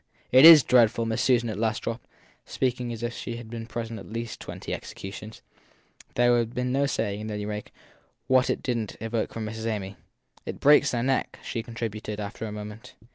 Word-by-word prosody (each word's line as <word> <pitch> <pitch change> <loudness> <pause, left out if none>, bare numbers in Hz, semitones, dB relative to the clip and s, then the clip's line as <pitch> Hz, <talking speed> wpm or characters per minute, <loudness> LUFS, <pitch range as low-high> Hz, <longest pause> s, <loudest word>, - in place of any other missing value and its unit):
It 130 +4 +8
is 165 -4 +11
dreadful! 115 -2 +4
Miss 110 -1 -1
Susan 120 -2 +3
at 105 -2 -4
last 110 -1 -1
dropped, 115 +1 -4 0.4
speaking 125 -2 -2
as 115 0 -6
if 120 0 -2
she 120 0 -5
had 115 -1 -10
been 115 -1 -6
present 115 -1 -5
at 115 +3 -6
twenty - - -6
executions. 105 +3 -8 0.7
There 120 0 +4
would 120 - +4
have 115 0 -2
been 125 0 -1
no 140 +2 +2
saying, 110 -4 -2
at - - -4
any 105 0 -4
rate, 105 0 -5 0.6
what 130 -1 +3
it - - -1
didn 115 -4 -1
t - - -10
evoke 115 0 -2
from 115 -1 -5
Miss 110 +1 -6
Amy. 100 -3 -3 0.5
It - - -6
breaks 145 -1 +6
their 120 -1 -1
neck/ 135 +1 0
she 115 - -3
contributed 110 -2 -5
after 105 +2 -5
a - - -6
moment. 105 +5 -9
115 Hz, 200 wpm, -26 LUFS, 110-125 Hz, 0.7 s, is